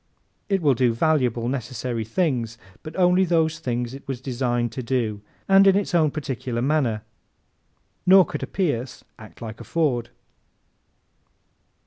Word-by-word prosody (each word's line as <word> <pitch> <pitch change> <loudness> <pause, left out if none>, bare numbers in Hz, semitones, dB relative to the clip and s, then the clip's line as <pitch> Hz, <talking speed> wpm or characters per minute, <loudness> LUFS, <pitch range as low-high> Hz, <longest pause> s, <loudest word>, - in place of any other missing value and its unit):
It 195 -3 +1
will 145 -3 +5
do 120 -2 +1
valuable, 125 -5 +1
necessary 125 -2 -3
things 115 - -1 0.2
but 155 - -9
only 180 0 +4
those 165 -2 +1
things 120 -4 -3
it 135 - -11
was 135 -3 -4
designed 120 -2 -1
to 130 - -5
do 115 -4 -1 0.3
and 195 0 +6
in 195 - +6
its 200 -2 -1
own 160 -3 +4
particular 130 -5 -4
manner; 125 -5 0 1.0
nor 190 0 +8
could - - -5
a - - -3
Pierce 140 -10 -2 0.2
act 110 +1 -12
like 110 -1 -7
a - - -7
Ford. 135 -8 0
130 Hz, 145 wpm, -23 LUFS, 120-160 Hz, 1.0 s, nor